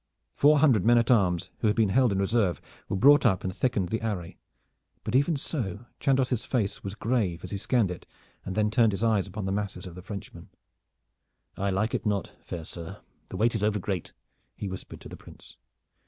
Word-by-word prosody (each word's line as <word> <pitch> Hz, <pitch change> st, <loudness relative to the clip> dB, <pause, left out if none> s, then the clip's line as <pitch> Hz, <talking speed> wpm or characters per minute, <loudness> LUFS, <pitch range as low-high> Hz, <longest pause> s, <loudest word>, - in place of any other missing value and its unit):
Four 150 Hz, +2 st, +5 dB
hundred 135 Hz, -, +4 dB
men 120 Hz, +3 st, +5 dB
at 115 Hz, +1 st, +3 dB
arms 90 Hz, -7 st, +2 dB
who 110 Hz, -, +1 dB
had 105 Hz, -, +2 dB
been 110 Hz, -3 st, +3 dB
held 125 Hz, +2 st, +3 dB
in 100 Hz, -, 0 dB
reserve 100 Hz, -2 st, +1 dB, 0.3 s
were -, -, -1 dB
brought 145 Hz, +9 st, +6 dB
up 100 Hz, -8 st, +2 dB
and 95 Hz, -1 st, -3 dB
thickened 105 Hz, -8 st, 0 dB
the 110 Hz, -, -2 dB
array, 100 Hz, -7 st, -4 dB, 0.6 s
but -, -, -4 dB
even 145 Hz, +5 st, +3 dB
so 120 Hz, -, -4 dB
Chandos' 130 Hz, -3 st, +1 dB
face 110 Hz, -7 st, -2 dB
was 100 Hz, 0 st, -5 dB
grave 110 Hz, -8 st, -1 dB
as -, -, -7 dB
he 100 Hz, -, -2 dB
scanned 110 Hz, -1 st, +1 dB
it 90 Hz, -, -8 dB, 0.4 s
and 95 Hz, -, -5 dB
then 105 Hz, 0 st, +1 dB
turned 110 Hz, -2 st, +3 dB
his 100 Hz, -, -3 dB
eyes 110 Hz, -4 st, +2 dB
upon 100 Hz, +1 st, -5 dB
the 95 Hz, -, -1 dB
masses 100 Hz, -2 st, -3 dB
of 90 Hz, -, -8 dB
the 90 Hz, -, -9 dB
Frenchmen. 100 Hz, 0 st, -9 dB, 1.1 s
"I 100 Hz, +1 st, -1 dB
like 100 Hz, +4 st, 0 dB
it -, -, -1 dB
not, 100 Hz, -2 st, -1 dB
fair 85 Hz, -2 st, -6 dB
sir. 85 Hz, 0 st, -8 dB, 0.3 s
The -, -, -6 dB
weight 115 Hz, +2 st, +2 dB
is 110 Hz, -, -1 dB
overgreat," 105 Hz, -4 st, -1 dB, 0.4 s
he 100 Hz, -, -5 dB
whispered 95 Hz, -1 st, -8 dB
to -, -, -10 dB
the -, -, -9 dB
Prince. -, -, -14 dB
105 Hz, 205 wpm, -27 LUFS, 95-120 Hz, 1.1 s, brought